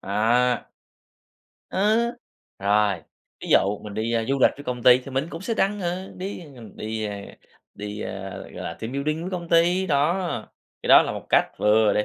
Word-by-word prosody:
á. 120 Hz, +4 st, +2 dB, 1.1 s
Ơ, 210 Hz, +4 st, +3 dB, 0.6 s
rồi, 100 Hz, 0 st, +3 dB, 0.5 s
ví -, -, -6 dB
dụ 100 Hz, +1 st, +3 dB
mình 105 Hz, -1 st, -8 dB
đi, 110 Hz, +2 st, -1 dB
ơ, 115 Hz, -1 st, +1 dB
du 135 Hz, -, +1 dB
lịch -, -, +6 dB
với 145 Hz, -, -10 dB
công 125 Hz, -1 st, -4 dB
ty 125 Hz, 0 st, +8 dB
thì 135 Hz, +1 st, -10 dB
mình 135 Hz, +3 st, -1 dB
cũng 165 Hz, -, -7 dB
sẽ 230 Hz, +2 st, -1 dB
đăng. 205 Hz, 0 st, +1 dB
Ờ, 180 Hz, +2 st, -3 dB
đi, 190 Hz, +1 st, -5 dB
ờ, 165 Hz, -, -11 dB
ng 110 Hz, -, -12 dB
đi, 110 Hz, 0 st, -4 dB
a, 100 Hz, -1 st, -5 dB, 0.5 s
đi, 105 Hz, +1 st, -6 dB
ơ, 95 Hz, -2 st, -6 dB
gọi -, -, -12 dB
là, 85 Hz, -, -4 dB
team 115 Hz, +3 st, -5 dB
building 155 Hz, +4 st, -1 dB
với 185 Hz, -, -4 dB
công 175 Hz, -2 st, -5 dB
ty, 175 Hz, +3 st, +3 dB
đó. 150 Hz, +2 st, +2 dB, 0.7 s
Cái -, -, -5 dB
đó -, -, +9 dB
là -, -, -3 dB
một -, -, -7 dB
cách -, -, +5 dB
vừa 105 Hz, 0 st, +4 dB
để 105 Hz, -, +1 dB
125 Hz, 205 wpm, -24 LUFS, 105-170 Hz, 1.1 s, đó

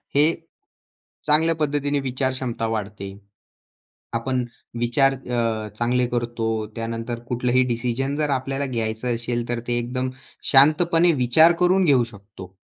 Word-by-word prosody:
हे 155 Hz, +3 st, +4 dB, 0.9 s
चांगल्या 160 Hz, +2 st, +3 dB
पद्धतीने 145 Hz, -2 st, 0 dB
विचार 130 Hz, 0 st, -1 dB
क्षमता 125 Hz, -3 st, -3 dB
वाढते. 105 Hz, -3 st, -4 dB, 1.0 s
आपण 125 Hz, +2 st, -1 dB, 0.4 s
विचार 135 Hz, +3 st, +3 dB
अ, 115 Hz, -4 st, -2 dB
चांगले 125 Hz, +1 st, +1 dB
करतो 120 Hz, -1 st, -2 dB, 0.3 s
त्यानंतर 115 Hz, +1 st, -4 dB
कुठलंही 125 Hz, +1 st, +2 dB
डिसिजन 125 Hz, +3 st, -1 dB
जर 150 Hz, -1 st, 0 dB
आपल्याला 135 Hz, +1 st, -1 dB
घ्यायचं 115 Hz, 0 st, -2 dB
असेल 120 Hz, 0 st, -3 dB
तर 120 Hz, -1 st, -2 dB
ते 120 Hz, 0 st, +1 dB
एकदम 125 Hz, +2 st, -2 dB, 0.4 s
शांतपणे 165 Hz, +5 st, +5 dB
विचार 150 Hz, +5 st, +5 dB
करून 185 Hz, +1 st, +4 dB
घेऊ 135 Hz, -6 st, +4 dB
शकतो. 100 Hz, -4 st, -13 dB
125 Hz, 125 wpm, -23 LUFS, 115-140 Hz, 1.0 s, शांतपणे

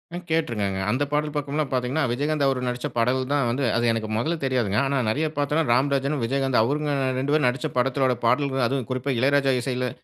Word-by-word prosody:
ம் 180 Hz, -, -6 dB
கேட்ருக்கேங்க. 110 Hz, -12 st, -1 dB
அந்த 130 Hz, +5 st, +1 dB
பாடல் 150 Hz, 0 st, -1 dB
பக்கம்லாம் 145 Hz, 0 st, -2 dB
பார்த்தீங்கன்னா, 130 Hz, +4 st, 0 dB
விஜயகாந்த் 145 Hz, +3 st, 0 dB
அவரு 135 Hz, -2 st, 0 dB
நடிச்ச 125 Hz, +3 st, -2 dB
பாடல் 125 Hz, +3 st, +2 dB
தான் 140 Hz, -3 st, +2 dB
வந்து 130 Hz, +4 st, -1 dB
அது 120 Hz, +1 st, +1 dB
எனக்கு 110 Hz, -1 st, -3 dB
மொதல்ல 160 Hz, +9 st, 0 dB
தெரியாதுங்க. 120 Hz, -6 st, 0 dB
ஆனா, 135 Hz, +1 st, 0 dB
நெறையா 150 Hz, +8 st, 0 dB
பார்த்தோம்ன்னா, 150 Hz, +3 st, +1 dB
ராம்ராஜனும், 140 Hz, +1 st, +1 dB
விஜயகாந்தும் 135 Hz, 0 st, +1 dB
அவங்க 145 Hz, +4 st, -1 dB, 0.3 s
2 135 Hz, +2 st, -1 dB
பேரும் 150 Hz, -4 st, +3 dB
நடிச்ச 135 Hz, +6 st, -1 dB
படத்தோட 130 Hz, 0 st, +2 dB
பாடல்கள், 135 Hz, +1 st, +2 dB
அதுவும் 135 Hz, -1 st, -2 dB
குறிப்பா 130 Hz, +2 st, -1 dB
இளையராஜா 135 Hz, +1 st, +3 dB
இசையில 125 Hz, 0 st, -2 dB
135 Hz, 185 wpm, -24 LUFS, 125-145 Hz, 0.3 s, பேரும்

